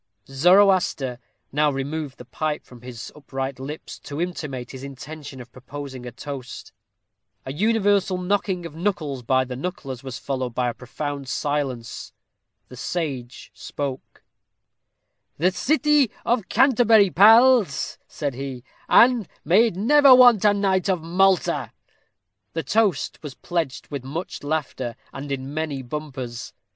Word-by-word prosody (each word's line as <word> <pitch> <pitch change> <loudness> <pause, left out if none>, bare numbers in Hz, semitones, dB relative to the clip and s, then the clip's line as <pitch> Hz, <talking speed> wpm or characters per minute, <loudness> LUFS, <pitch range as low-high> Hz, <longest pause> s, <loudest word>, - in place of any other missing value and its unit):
_ - - -13
Zoroaster 180 -5 +3 0.3
now 150 +1 +2
removed 140 +1 -4
the 125 - -11
pipe 150 +4 -3
from 125 -2 -15
his 120 -1 -9
upright 135 -2 -5
lips 145 +4 -7
to 145 +1 -7
intimate 150 -8 -4
his 130 0 -9
intention 140 +1 -9
of 120 -1 -11
proposing 130 -1 -8
a - - -6
toast. 130 +1 -8 0.7
A 130 - -5
universal 200 0 +2
knocking 180 -1 -1
of 165 - -7
knuckles 160 -6 -2
by 130 +2 +2
the 125 0 -6
knucklers 135 -4 -6
was 130 -1 -6
followed 130 -3 -4
by 125 -1 0
profound 140 +2 -6
silence. 135 -6 -3 0.5
The 125 - -12
sage 130 -3 -4
spoke: 140 -2 -6 1.1
"The 180 +5 +3
city 295 - +2 0.2
of 235 -4 0
Canterbury, 230 -5 +5
pals," 220 - +5
said 145 -3 -4
he; 130 -1 -6 0.3
"and 240 -5 +5 0.2
may 195 +9 +5
it 220 - -4
never 270 +6 +6
want 245 -5 +7
a 210 - +6
knight 195 -1 +1
of 180 -4 0
Malta." 185 +2 +1 0.8
The 165 - -2
toast 215 -4 0
was 145 -4 -8
pledged 160 -8 -3
with 140 -3 -4
much 155 +7 -6
laughter, 140 -5 -3 0.2
and 140 +2 -7
in 135 +1 -4
many 150 -4 -3
bumpers. 130 -3 -6
150 Hz, 135 wpm, -23 LUFS, 130-190 Hz, 1.1 s, want